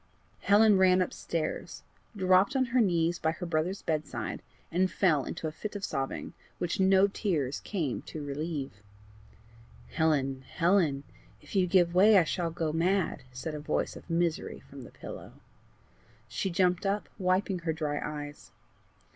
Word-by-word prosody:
Helen 205 -1 +5
ran 185 -1 +5
upstairs, 170 -3 -3 0.3
dropped 185 +6 +4
on 260 -1 +3
her 255 - +5
knees 170 -4 +1
by 160 0 0
her 175 - -6
brother's 170 +4 -1
bedside, 155 -2 -3 0.3
and 185 +2 +2
fell 155 -10 +2
into 160 - -4
a - - -3
fit 210 +7 -7
of 200 - -3
sobbing, 135 -2 -4 0.2
which 175 +3 -2
no 190 0 +5
tears 165 - -1
came 160 - -3
to 150 -2 -6
relieve. 145 0 -3 1.2
"Helen! 140 -5 +1
Helen! 165 -2 +1 0.4
if - - -12
you 185 -2 +3
give 175 -1 +3
way 200 +3 +7
I 180 - +6
shall 170 +1 -1
go 160 -2 -2
mad," 175 -1 +1
said 130 +5 -5
a 150 - -4
voice 150 - -2
of - - -12
misery 170 -1 -1
from - - -11
the - - -10
pillow. - - -9 0.9
She 195 - -2
jumped 180 +1 +1
up, 205 +1 -1
wiping 185 0 +1
her 165 -1 -1
dry 150 -2 -2
eyes. 145 -1 -7
170 Hz, 155 wpm, -29 LUFS, 155-190 Hz, 1.2 s, way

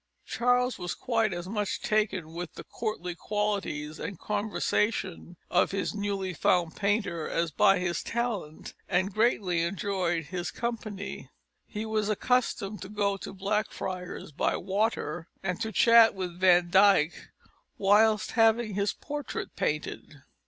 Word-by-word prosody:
Charles 245 0 +1
was 175 -1 -3
quite 225 -3 0
as 175 0 -5
much 210 0 -2
taken 195 -7 0
with 175 0 -6
the - - -8
courtly 215 -6 -4
qualities 190 -6 -2
and 200 - -5
conversation 205 -3 -1
of 180 - +3
his 195 -1 -2
newly 200 -3 -2
found 170 -1 +1
painter 200 -6 0
as 170 -1 0
by 195 +6 +5
his 175 -1 -1
talent, 230 -10 -3 0.2
and 185 +2 +1
greatly 200 -6 +2
enjoyed 175 -2 -1
his 175 +3 -4
company. 215 -4 -5 0.4
He 210 0 -5
was 215 -1 0
accustomed 215 -3 0
to 190 - -7
go 205 -1 0
to - - -7
Blackfriars 190 -3 -3
by 145 - 0
water, 195 -4 -1 0.2
and 180 -2 -2
to 220 - -2
chat 230 0 +6
with 180 -2 -5
Van 175 -2 +5
Dyck 190 -4 +4 0.5
whilst 210 +2 +4
having 225 -1 +3
his 200 +1 0
portrait 290 -1 -5
painted. 150 -1 -3
200 Hz, 135 wpm, -28 LUFS, 175-215 Hz, 0.5 s, chat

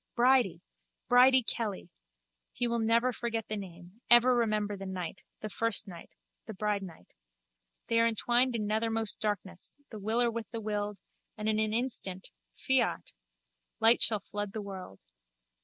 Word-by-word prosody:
Bridie! 250 -5 +3 0.5
Bridie 255 +1 +6
Kelly! 210 -6 -4 0.6
He 245 - +1
will 235 0 0
never 230 +3 +2
forget 230 -2 -3
the 215 - -3
name, 185 +1 -10
ever 240 +1 +7
remember 215 -3 0
the 195 0 -7
night: 185 -1 -5 0.3
first 220 0 -1
night, 170 -3 -10 0.4
the 220 - -7
bridenight. 195 - -4 0.8
They 230 - +1
are 230 - +4
entwined 240 +2 +2
in 215 -2 -2
nethermost 225 +1 0
darkness, 200 -2 -4
the 215 - -7
willer 230 +4 +1
with 230 -1 -6
the 230 - -5
willed, 210 -1 -3 0.4
and 215 0 -4
in 215 0 +1
an 215 0 +1
instant 220 -6 -2 0.3
(fiat!) - - 0 0.7
light 225 +2 +6
shall 215 -2 +3
flood 205 0 -5
the 220 - -4
world. 190 - -9
220 Hz, 145 wpm, -30 LUFS, 200-235 Hz, 0.8 s, ever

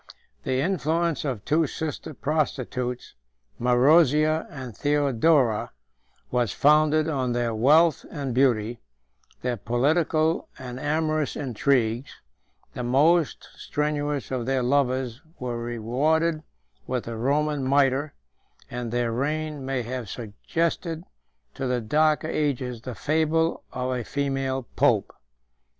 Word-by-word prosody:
128 130 - 0
The 135 - +1
influence 165 -3 0
of 125 -7 -3
two 155 +1 +2
sister 155 0 -5
prostitutes, 130 -4 -2 0.5
Marozia 150 +5 +4
and 130 - -8
Theodora, 140 -4 +2 0.6
was 120 -5 +1
founded 155 +3 +4
on 130 -6 -1
their 120 -1 0
wealth 150 +8 +4
and 140 -5 -4
beauty, 120 -3 +1 0.6
their 125 -1 -1
political 155 - +1
and 125 -1 -7
amorous 155 +1 0
intrigues: 125 -2 0 0.6
the - - -5
most 150 +7 +2
strenuous 145 -2 -2
of 125 -2 -2
their 135 -1 +1
lovers 130 -1 0 0.2
were 120 -2 -4
rewarded 145 +8 0 0.5
with 125 -1 -1
the 115 - -6
Roman 145 +4 0
mitre, 135 +2 +2 0.6
and 120 -1 -4
their 120 -1 0
reign 150 +5 -1
129 135 - -8
may 135 -2 -1
have 120 -2 -5
suggested 165 - -3 0.5
to 135 -1 -3
the 125 -1 0
darker 155 +7 +2
ages 130 -6 -1
130 125 +3 -7
the - - -8
fable 160 +3 +2 0.2
131 - - -19 0.2
of 125 - -1
a - - -4
female 135 -2 -1
pope. - - +2
135 Hz, 125 wpm, -25 LUFS, 125-155 Hz, 0.6 s, Marozia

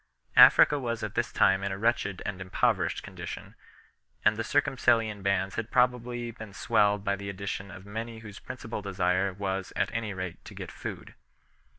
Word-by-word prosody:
Africa 145 - +8
was 115 -3 -3
at - - -4
this - - -1
time 95 +2 +3
in 100 - -1
a 95 - -3
wretched 105 -3 0
and 95 -1 -4
impoverished 95 -1 0
condition, - - -8 0.7
and 105 0 +5
the 115 - -2
Circumcellion 115 -6 +2
bands 95 0 0
had 115 0 -3
probably 125 -1 +1
been 110 -3 -10
swelled 105 -2 +2
by 100 -1 +1
the 100 0 -6
addition 100 0 -5
of 95 -1 -11
many 115 +3 -5
whose 105 -2 -10
principal 120 -4 -6
desire 95 -1 0
was 95 0 -3
at 95 - 0
any 110 -2 -2
rate 90 -3 -6
to - - -11
get - - -7
food. - - -7
105 Hz, 175 wpm, -28 LUFS, 95-115 Hz, 0.7 s, Africa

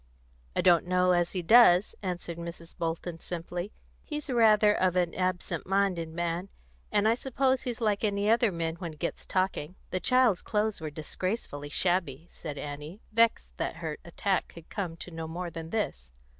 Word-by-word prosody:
"I - - +2
don't 175 -1 +5
know 180 0 +3
as 175 -1 +2
he 180 -2 -2
does," 210 -2 +7
answered 175 -3 -4
Mrs. 170 0 -8
Bolton 165 0 -3
simply. 175 +3 -5 0.3
"He's 300 -2 -5
rather 215 -3 +5
of 185 -2 +1
an 175 -2 +1
absent 185 -1 -2
minded 190 -4 +1
man, 170 +3 -2 0.4
and 210 0 +3
I 225 - +5
suppose 260 +1 +1
he's 245 -2 -4
like 210 -2 +1
other 210 +2 +3
men 165 -1 -2
when 170 -2 -5
he - - -16
gets 170 - -4
talking." 185 -3 -1 0.2
"The 185 - 0
child's 245 -1 +3
clothes 210 -3 -1
were 155 - -3
disgracefully 150 0 -4
shabby!" 170 -4 +1
said 150 -3 -7
Annie, 150 +7 -6
vexed 230 +1 +2
that - - -2
her 160 -2 -5
attack 185 +3 -1
could 170 -1 -14
come 180 -5 -3
to 175 - -8
no 165 -1 -5
more 175 +2 -4
than 165 0 -7
this. 65 - -3
180 Hz, 170 wpm, -29 LUFS, 165-210 Hz, 0.4 s, does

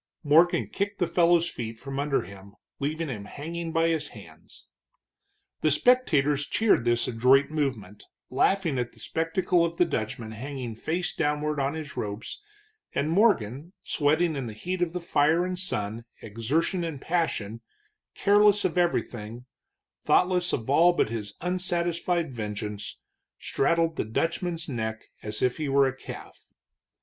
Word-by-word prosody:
Morgan 165 +4 +4
kicked 200 +1 -3
the 175 - +1
fellow's 170 0 +3
feet 115 -7 -5
from 135 +3 -5
under 145 -1 +1
him, 100 +2 -13 0.2
leaving 155 +3 -2
him 110 -7 -5
hanging 165 +6 -5
by 165 0 +2
his 155 -2 0
hands. - - -14 0.9
The - - +2
spectators 150 - +3
cheered 215 - +2
this 120 0 +2
adroit 125 +5 +4
movement, 125 -10 -3 0.3
laughing 165 +1 +2
at 120 -1 -3
the - - -17
spectacle 170 +2 +1
of 170 0 -2
the 175 - +4
Dutchman 110 -6 -3
hanging 125 +1 -5
face 165 +10 -2
downward 150 0 0
on 140 +2 0
his 155 -3 -7
ropes, 105 - -5 0.5
and 150 +3 0
Morgan, 165 - +2
sweating 155 +3 +1
in 135 -3 -3
the 110 - -6
heat 180 +12 -4
of 175 -1 0
the 180 - -3
fire 165 +1 +2
and 180 0 -3
sun, 115 - -3 0.2
exertion 130 - -1
and 160 -4 -4
passion, 115 - -1 0.5
careless 205 0 +4
of 180 0 +1
everything, 120 -9 -2 0.6
thoughtless 180 -1 +3
of 110 - -2
all 165 +6 +5
but 140 - +1
his 105 -3 -5
unsatisfied 175 -3 -1
vengeance, 105 -2 -5 0.4
straddled 165 +2 +1
the - - -1
Dutchman's 165 - -2
neck 110 -4 -4
as 105 0 -3
if 125 -1 +1
he 150 -2 -2
were 140 0 +4
a 130 - -3
calf. - - -10
150 Hz, 150 wpm, -27 LUFS, 120-175 Hz, 0.9 s, all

